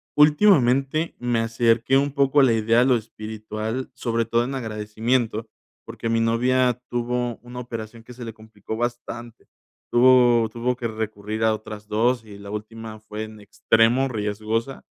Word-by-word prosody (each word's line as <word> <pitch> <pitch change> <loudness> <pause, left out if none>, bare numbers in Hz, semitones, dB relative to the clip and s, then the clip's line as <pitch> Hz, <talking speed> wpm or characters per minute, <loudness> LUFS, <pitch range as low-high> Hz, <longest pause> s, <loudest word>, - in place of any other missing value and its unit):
últimamente 150 -2 +4
me 120 -1 0
acerqué 115 +3 +2
un 140 +1 +1
poco 140 0 +3
a - - +6
la 120 -3 +4
idea 115 +1 +3
de 125 - +4
lo 130 -2 +4
espiritual, 110 +2 -5
sobre 115 -3 -1
todo 115 +1 +1
en 135 +3 -4
agradecimiento, 110 0 -1 0.4
porque 115 - -5
mi 115 - +2
novia 125 +2 +2
tuvo 120 0 -2
una 120 +1 -9
operación 115 -2 -7
que 125 - -12
se 120 0 -8
le 115 - -6
complicó 110 -1 -8
bastante, 120 -1 -5 0.4
tuvo 120 -2 +5
tuvo 120 +3 -1
que 120 -1 -3
recurrir 110 0 -4
a 110 -1 +4
otras 105 -1 -9
2, 115 +2 +1
y 100 -2 -11
la 100 0 -10
última 110 +1 -7
fue 110 0 -7
en 110 0 -10
extremo 115 +5 +2
riesgosa 110 +3 -3
115 Hz, 160 wpm, -23 LUFS, 110-125 Hz, 0.4 s, a